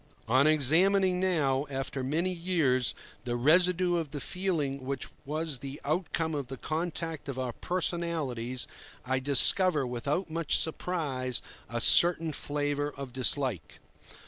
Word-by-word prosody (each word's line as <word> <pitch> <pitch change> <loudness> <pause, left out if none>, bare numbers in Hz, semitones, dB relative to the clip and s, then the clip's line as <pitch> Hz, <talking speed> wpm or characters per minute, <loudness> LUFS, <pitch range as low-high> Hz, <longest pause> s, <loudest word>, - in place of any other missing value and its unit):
On 130 +5 +4
examining 180 +6 +4
now, 150 -7 +1
after 135 0 -4
many 165 +8 0
years, 165 -8 0 0.3
the 120 -1 -2
residue 175 +6 +3
of 160 -3 -3
the 145 0 -6
feeling 150 -7 -2
which 135 0 -3 0.2
was 155 -1 -3
the 135 +2 -7
outcome 160 +1 -1
of 140 -4 -3
the 135 +1 -7
contact 160 0 -4
of 135 - -4
our 130 -2 -3
personalities, 155 -10 -2 0.4
I 130 +1 0
discover, 145 +3 +4
without 140 +9 -2
much 165 -1 +1
surprise, 145 -7 -1 0.3
a 120 - -2
certain 165 +4 +4
flavour 145 0 -2
of 135 -3 -8
dislike. 125 - +1
145 Hz, 130 wpm, -29 LUFS, 130-170 Hz, 0.4 s, On